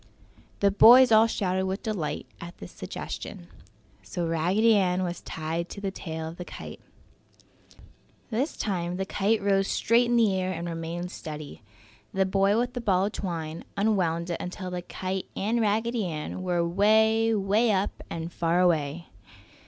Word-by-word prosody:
The 200 Hz, 0 st, +4 dB
boys 245 Hz, +5 st, +8 dB
all 220 Hz, +1 st, +7 dB
shouted 190 Hz, -4 st, -1 dB
with 190 Hz, +2 st, -3 dB
delight 200 Hz, -9 st, -3 dB
at 175 Hz, +1 st, -9 dB
this 90 Hz, -, -10 dB
new -, -, -26 dB
suggestion. 85 Hz, -, -7 dB, 0.5 s
So 100 Hz, -, -4 dB
Raggedy 180 Hz, +8 st, +3 dB
Ann 185 Hz, -2 st, +2 dB
was 175 Hz, -1 st, -4 dB
tied 165 Hz, +2 st, -4 dB
to -, -, -7 dB
the 195 Hz, -1 st, -3 dB
tail 160 Hz, -4 st, -6 dB
of 165 Hz, +2 st, -8 dB
the 180 Hz, -, -5 dB
kite. -, -, -9 dB, 1.5 s
This 260 Hz, +8 st, -1 dB
time 180 Hz, -3 st, -2 dB
the 190 Hz, -, -2 dB
kite 205 Hz, +2 st, 0 dB
rose 195 Hz, -1 st, +2 dB
straight 235 Hz, +2 st, +2 dB
in 240 Hz, -, +2 dB
the 225 Hz, -4 st, +4 dB
air 185 Hz, 0 st, -1 dB
and 170 Hz, 0 st, -5 dB
remained 170 Hz, +2 st, -4 dB
steady. 150 Hz, -5 st, -8 dB, 0.5 s
The 190 Hz, 0 st, +3 dB
boy 195 Hz, +2 st, +2 dB
with 245 Hz, +1 st, 0 dB
the 245 Hz, -, -4 dB
ball 190 Hz, -4 st, +2 dB
of 205 Hz, -, -2 dB
twine 165 Hz, -5 st, -4 dB
unwound 180 Hz, -5 st, +1 dB
it 170 Hz, -, -1 dB
until 180 Hz, +1 st, -6 dB
the 180 Hz, 0 st, -3 dB
kite 185 Hz, +1 st, -4 dB
and 225 Hz, +4 st, 0 dB
Raggedy 225 Hz, +1 st, 0 dB
Ann 155 Hz, +2 st, -5 dB
were 175 Hz, -2 st, 0 dB
'way, 220 Hz, +4 st, +3 dB
'way 210 Hz, +3 st, +2 dB
up 195 Hz, 0 st, +1 dB, 0.2 s
and 165 Hz, +1 st, -5 dB
far 170 Hz, +1 st, +1 dB
away. 165 Hz, -2 st, +1 dB
190 Hz, 170 wpm, -27 LUFS, 170-215 Hz, 1.5 s, boys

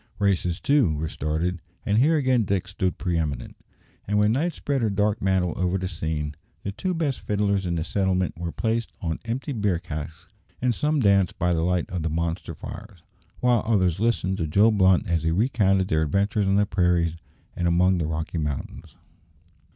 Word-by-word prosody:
Races, 90 Hz, -4 st, +1 dB
too, 135 Hz, -, +3 dB
were 80 Hz, +2 st, -2 dB
started, 80 Hz, +4 st, -2 dB, 0.3 s
and 105 Hz, +1 st, +2 dB
here 155 Hz, +5 st, +4 dB
again 130 Hz, -5 st, +2 dB
Dick 95 Hz, -2 st, -1 dB
stood 95 Hz, -1 st, -2 dB
pre 90 Hz, -3 st, -1 dB
eminent; 70 Hz, -6 st, -3 dB, 0.5 s
and 105 Hz, +1 st, +1 dB
when 105 Hz, +1 st, +4 dB
night 155 Hz, +7 st, 0 dB
spread 140 Hz, -2 st, -1 dB
her 110 Hz, -, +2 dB
dark 105 Hz, +1 st, 0 dB
mantle 95 Hz, -3 st, +1 dB
over 90 Hz, +1 st, 0 dB
the 95 Hz, 0 st, -3 dB
scene, 80 Hz, -3 st, -3 dB, 0.3 s
the 100 Hz, -, -3 dB
two 180 Hz, -, -2 dB
best 150 Hz, -6 st, -1 dB
fiddlers 100 Hz, -2 st, 0 dB
in 85 Hz, -, -1 dB
the 80 Hz, -, -1 dB
settlement 95 Hz, 0 st, 0 dB
were 85 Hz, 0 st, -4 dB
placed 115 Hz, +2 st, -1 dB
on 80 Hz, -3 st, -3 dB
empty 125 Hz, +6 st, -3 dB
beer 105 Hz, -7 st, 0 dB
casks, 80 Hz, 0 st, -7 dB, 0.3 s
and 125 Hz, -1 st, +1 dB
some 150 Hz, +4 st, 0 dB
danced 100 Hz, -4 st, +3 dB
by 90 Hz, 0 st, +1 dB
the 80 Hz, -, 0 dB
light 90 Hz, 0 st, 0 dB
of 90 Hz, -2 st, -2 dB
the 80 Hz, -, -1 dB
monster 85 Hz, +2 st, -3 dB
fires, 100 Hz, -3 st, -10 dB, 0.4 s
while 125 Hz, -3 st, +3 dB
others 95 Hz, -6 st, +1 dB
listened 105 Hz, -4 st, +1 dB
to 80 Hz, -, -1 dB
Joe 100 Hz, +8 st, +4 dB
Blunt 95 Hz, -3 st, +3 dB
as 85 Hz, -2 st, +1 dB
he 80 Hz, -, 0 dB
recounted 95 Hz, -1 st, +2 dB
their 80 Hz, 0 st, +2 dB
adventures 100 Hz, +6 st, +1 dB
on 95 Hz, -, +3 dB
the 105 Hz, +1 st, +4 dB
prairies 90 Hz, -3 st, +1 dB, 0.4 s
and 85 Hz, -, 0 dB
among 90 Hz, +2 st, +3 dB
the 80 Hz, -, -1 dB
Rocky 80 Hz, +1 st, -3 dB
Mountains. 75 Hz, -4 st, -5 dB
95 Hz, 190 wpm, -25 LUFS, 85-105 Hz, 0.5 s, here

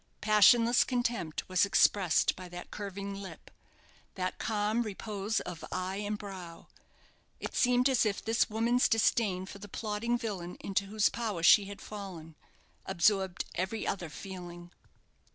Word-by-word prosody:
Passionless 230 Hz, +3 st, +6 dB
contempt 240 Hz, -, -2 dB
was 185 Hz, -2 st, +3 dB
expressed 200 Hz, -2 st, +3 dB
by 180 Hz, -1 st, -9 dB
that 175 Hz, 0 st, -9 dB
curving 200 Hz, -1 st, -5 dB
lip, 195 Hz, -1 st, -9 dB, 0.6 s
that 185 Hz, -1 st, -3 dB
calm 215 Hz, +1 st, 0 dB
repose 210 Hz, -1 st, -3 dB
of 175 Hz, -2 st, -7 dB
eye 185 Hz, +1 st, -3 dB
and 210 Hz, +1 st, -3 dB
brow. 185 Hz, -5 st, -9 dB, 0.7 s
It -, -, -6 dB
seemed 250 Hz, +1 st, +3 dB
as 260 Hz, -3 st, +3 dB
if 210 Hz, -2 st, -2 dB
this 225 Hz, +1 st, +2 dB
woman's 230 Hz, +3 st, +2 dB
disdain 210 Hz, -4 st, +2 dB
for 200 Hz, +1 st, -10 dB
the 205 Hz, 0 st, -10 dB
plotting 225 Hz, +4 st, -2 dB
villain 195 Hz, -7 st, -5 dB
into 200 Hz, 0 st, -1 dB
whose 210 Hz, +1 st, +2 dB
power 215 Hz, -8 st, -3 dB
she 200 Hz, +4 st, +7 dB
had 200 Hz, 0 st, -9 dB
fallen 185 Hz, -6 st, -8 dB, 0.5 s
absorbed 190 Hz, 0 st, +1 dB
every 190 Hz, +5 st, -2 dB
other 180 Hz, -4 st, -3 dB
feeling. 175 Hz, 0 st, -9 dB
200 Hz, 140 wpm, -31 LUFS, 185-220 Hz, 0.7 s, she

